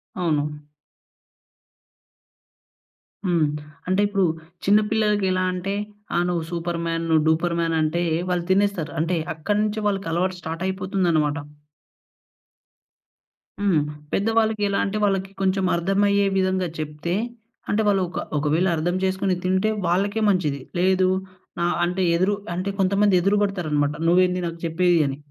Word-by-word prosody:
అవును. 150 Hz, -4 st, -1 dB, 2.6 s
హ్మ్. 170 Hz, -4 st, +2 dB, 0.4 s
అంటే 185 Hz, +2 st, +2 dB
ఇప్పుడు 200 Hz, -2 st, +1 dB, 0.4 s
చిన్న 205 Hz, +2 st, +6 dB
పిల్లలకి 210 Hz, -2 st, +2 dB
ఎలా 185 Hz, 0 st, +1 dB
అంటే, 185 Hz, +2 st, -3 dB, 0.4 s
ఆహ్, 175 Hz, -, +3 dB
నువ్వు 170 Hz, -2 st, -1 dB
సూపర్ 170 Hz, 0 st, -2 dB
మ్యాన్, 165 Hz, 0 st, -1 dB
నువు 160 Hz, -1 st, +4 dB
డూపర్ 165 Hz, +2 st, +2 dB
మ్యాన్ 165 Hz, -1 st, 0 dB
అంటే 160 Hz, +3 st, 0 dB, 0.3 s
వాళ్ళు 175 Hz, -1 st, 0 dB
తినేస్తారు. 190 Hz, -5 st, +1 dB
అంటే 170 Hz, +1 st, 0 dB, 0.2 s
అక్కడ 185 Hz, +6 st, -1 dB
నుంచి 215 Hz, 0 st, -2 dB
వాళ్ళకి 195 Hz, -4 st, -1 dB
అలవాటు 180 Hz, +2 st, 0 dB
స్టార్ట్ 165 Hz, +2 st, -5 dB
అయిపోతుందన్నమాట. 185 Hz, -6 st, 0 dB, 2.2 s
హ్మ్. 190 Hz, -6 st, +3 dB, 0.3 s
పెద్దవాళ్ళకి 220 Hz, 0 st, +1 dB
ఎలా 200 Hz, -, 0 dB
అంటే 200 Hz, +2 st, -2 dB
వాళ్ళకి 195 Hz, -1 st, 0 dB
కొంచెం 190 Hz, 0 st, +1 dB
అర్థం 195 Hz, +4 st, +1 dB
అయ్యే 200 Hz, 0 st, +3 dB
విధంగా 185 Hz, -1 st, +1 dB
చెప్తే 155 Hz, +3 st, -3 dB, 0.6 s
అంటే 215 Hz, +2 st, +2 dB
వాళ్ళు 195 Hz, -2 st, +3 dB
ఒక -, -, -4 dB, 0.2 s
ఒకవేళ 155 Hz, +5 st, +1 dB
అర్థం 175 Hz, +3 st, 0 dB
చేసుకొని 190 Hz, 0 st, +1 dB
తింటే 190 Hz, +3 st, +2 dB, 0.2 s
వాళ్ళకే 200 Hz, +5 st, +1 dB
మంచిది. 150 Hz, -8 st, 0 dB, 0.2 s
లేదు 185 Hz, 0 st, +3 dB, 0.6 s
ఆహ్, 175 Hz, 0 st, +1 dB
అంటే 180 Hz, +2 st, -2 dB, 0.2 s
ఎదురు 195 Hz, +3 st, +2 dB, 0.2 s
అంటే 185 Hz, +2 st, -2 dB
కొంతమంది 200 Hz, +1 st, +3 dB
ఎదురు 200 Hz, +3 st, +2 dB
పడతారు 190 Hz, -6 st, -2 dB
అన్నమాట 145 Hz, 0 st, +1 dB
నువ్వు 180 Hz, +2 st, +5 dB
ఏంది 180 Hz, 0 st, -1 dB
నాకు 165 Hz, 0 st, -7 dB
చెప్పేది? 170 Hz, +1 st, +2 dB
అని. 135 Hz, 0 st, -4 dB
185 Hz, 140 wpm, -23 LUFS, 165-195 Hz, 2.6 s, చిన్న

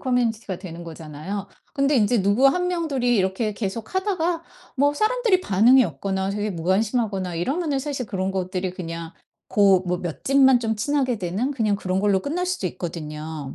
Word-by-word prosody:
커뮤니티가 230 Hz, -7 st, -1 dB
되는 175 Hz, -2 st, -8 dB
거잖아요. 165 Hz, +5 st, -6 dB, 0.3 s
근데 280 Hz, 0 st, +2 dB
인제 215 Hz, 0 st, +3 dB
누구 205 Hz, +8 st, +4 dB
1 360 Hz, +5 st, +1 dB
명, 340 Hz, -2 st, -1 dB
둘이 245 Hz, -4 st, +1 dB
이렇게 190 Hz, +3 st, 0 dB
계속 215 Hz, -, -5 dB
하다가 355 Hz, -4 st, 0 dB, 0.3 s
뭐 285 Hz, +2 st, +3 dB
사람들이 440 Hz, -1 st, +2 dB
반응이 240 Hz, -, +5 dB
없거나 190 Hz, +4 st, -2 dB
되게 210 Hz, +1 st, -2 dB
무관심하거나 190 Hz, +1 st, 0 dB
이러면은 280 Hz, -, -1 dB
사실 270 Hz, -2 st, -3 dB
그런 190 Hz, -1 st, -2 dB
것들이 185 Hz, -1 st, -2 dB
그냥 165 Hz, -1 st, -6 dB, 0.4 s
고 195 Hz, -3 st, +4 dB
뭐 180 Hz, 0 st, 0 dB
몇 175 Hz, -4 st, -6 dB
집만 265 Hz, -2 st, +5 dB
좀 225 Hz, -1 st, -1 dB
친하게 255 Hz, 0 st, 0 dB
되는 195 Hz, +10 st, -2 dB
그냥 215 Hz, -6 st, +1 dB
그런 185 Hz, -1 st, -1 dB
걸로 200 Hz, -1 st, +3 dB
끝날 350 Hz, -, -2 dB
수도 365 Hz, -, -1 dB
있거든요. 155 Hz, -4 st, -6 dB
210 Hz, 375 characters per minute, -23 LUFS, 185-270 Hz, 0.4 s, 반응이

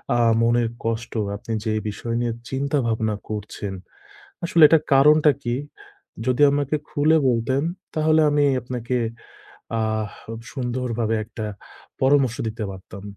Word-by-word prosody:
আ -, -, +3 dB, 0.2 s
মনের 120 Hz, 0 st, +2 dB
কষ্ট 115 Hz, 0 st, -3 dB, 0.2 s
আপনি 105 Hz, -, -8 dB
যে 110 Hz, -, 0 dB, 0.2 s
বিষয় 115 Hz, +3 st, -4 dB
নিয়ে 120 Hz, -1 st, -1 dB, 0.2 s
চিন্তা 140 Hz, +2 st, -1 dB
ভাবনা 110 Hz, -1 st, 0 dB
করছেন, 105 Hz, -2 st, -5 dB, 0.7 s
আসলে 170 Hz, -1 st, +3 dB
এটার 160 Hz, -1 st, +4 dB
কারণটা 150 Hz, +2 st, +6 dB
কী? 120 Hz, -1 st, -1 dB, 0.7 s
যদি 130 Hz, +2 st, +2 dB
আমাকে 145 Hz, +1 st, 0 dB
খুলে 155 Hz, +2 st, +3 dB
বলতেন, 125 Hz, +3 st, +1 dB, 0.3 s
তাহলে 155 Hz, 0 st, +3 dB
আমি 145 Hz, 0 st, +3 dB, 0.2 s
আপনাকে 125 Hz, 0 st, -3 dB, 0.8 s
আহ 110 Hz, -1 st, -1 dB, 0.4 s
সুন্দরভাবে 120 Hz, -3 st, -2 dB
একটা 110 Hz, +1 st, -8 dB, 0.6 s
পরামর্শ 130 Hz, -3 st, +3 dB
দিতে 110 Hz, 0 st, -4 dB
পারতাম। 95 Hz, +1 st, -11 dB
120 Hz, 125 wpm, -23 LUFS, 110-140 Hz, 0.8 s, কারণটা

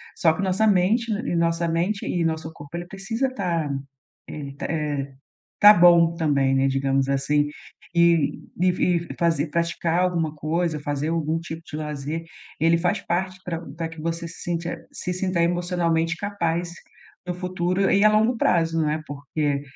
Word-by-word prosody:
só 160 Hz, -2 st, +3 dB
que 160 Hz, -, -4 dB
nossa 195 Hz, +3 st, +2 dB
mente 210 Hz, +4 st, +2 dB
e 215 Hz, +3 st, -2 dB
e -, -, 0 dB
nossa 170 Hz, 0 st, +1 dB
mente 175 Hz, +5 st, -1 dB
e 175 Hz, -, 0 dB
nosso 160 Hz, 0 st, -2 dB
corpo 145 Hz, +1 st, -10 dB
ele 175 Hz, -, -5 dB
precisa 220 Hz, +8 st, -2 dB
estar, 175 Hz, -, -2 dB, 0.6 s
eh, -, -, -7 dB
e 140 Hz, -1 st, -7 dB
t -, -, -6 dB
eh, 145 Hz, -3 st, -2 dB, 0.5 s
tá 210 Hz, +1 st, +11 dB
bom 170 Hz, -2 st, +6 dB
também, 140 Hz, -5 st, +2 dB
né, 135 Hz, 0 st, +3 dB
digamos 135 Hz, 0 st, +1 dB
assim, 145 Hz, +2 st, +1 dB, 0.4 s
e 170 Hz, -3 st, +3 dB, 0.2 s
e 185 Hz, -, +4 dB
e 175 Hz, -1 st, 0 dB
fazer 165 Hz, -2 st, +2 dB
praticar 170 Hz, +1 st, 0 dB
alguma 165 Hz, -4 st, 0 dB
coisa, 155 Hz, +1 st, -1 dB
fazer 145 Hz, +1 st, -2 dB
algum 165 Hz, -1 st, 0 dB
tipo 165 Hz, -1 st, -7 dB
de -, -, -6 dB
lazer, 150 Hz, +1 st, -4 dB, 0.4 s
ele 165 Hz, +1 st, +4 dB
faz 175 Hz, +1 st, 0 dB
parte 185 Hz, +1 st, -2 dB
pra 165 Hz, -2 st, -3 dB, 0.2 s
pra 165 Hz, -1 st, -3 dB
que 165 Hz, 0 st, -11 dB
você 165 Hz, +1 st, -3 dB
se 165 Hz, -, -12 dB
sinta 170 Hz, 0 st, -3 dB
se 180 Hz, -, -4 dB
sinta 185 Hz, -1 st, -1 dB
emocionalmente 170 Hz, -1 st, 0 dB
capaz 175 Hz, -4 st, -2 dB, 0.5 s
no 180 Hz, -, -1 dB
futuro, 185 Hz, +1 st, 0 dB
e 200 Hz, +1 st, +4 dB
a -, -, +8 dB
longo 220 Hz, +3 st, +3 dB
prazo, 165 Hz, -5 st, +2 dB
né, 155 Hz, +1 st, 0 dB
porque, 145 Hz, 0 st, -2 dB
170 Hz, 175 wpm, -24 LUFS, 155-180 Hz, 0.6 s, tá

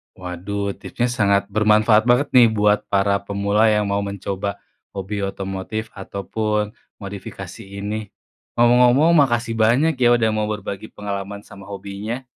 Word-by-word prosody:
Waduh, 95 Hz, +3 st, -4 dB
tipsnya 120 Hz, 0 st, -2 dB
sangat 100 Hz, -4 st, +2 dB
bermanfaat 110 Hz, +2 st, +4 dB
banget 125 Hz, +4 st, +3 dB
nih 125 Hz, -2 st, +7 dB
buat 105 Hz, -1 st, +1 dB
para 100 Hz, 0 st, +2 dB
pemula 100 Hz, +2 st, +1 dB
yang 105 Hz, -1 st, +3 dB
mau 100 Hz, -, +1 dB
mencoba 100 Hz, 0 st, -4 dB, 0.4 s
hobi 100 Hz, +2 st, -4 dB
otomotif 95 Hz, +3 st, -4 dB
ataupun 105 Hz, +2 st, -3 dB, 0.3 s
modifikasi 95 Hz, 0 st, -8 dB, 0.2 s
ini. 105 Hz, 0 st, -4 dB, 0.5 s
Ngomong-ngomong, 125 Hz, +6 st, +5 dB
makasih 120 Hz, -7 st, +2 dB
banyak 130 Hz, +6 st, +3 dB
ya 120 Hz, -1 st, +5 dB
udah 115 Hz, -2 st, +2 dB
mau 110 Hz, 0 st, -1 dB
berbagi 105 Hz, 0 st, -5 dB
pengalaman 100 Hz, 0 st, -6 dB
sama 100 Hz, 0 st, -13 dB
hobinya. 100 Hz, +5 st, -6 dB
105 Hz, 130 wpm, -21 LUFS, 100-115 Hz, 0.5 s, nih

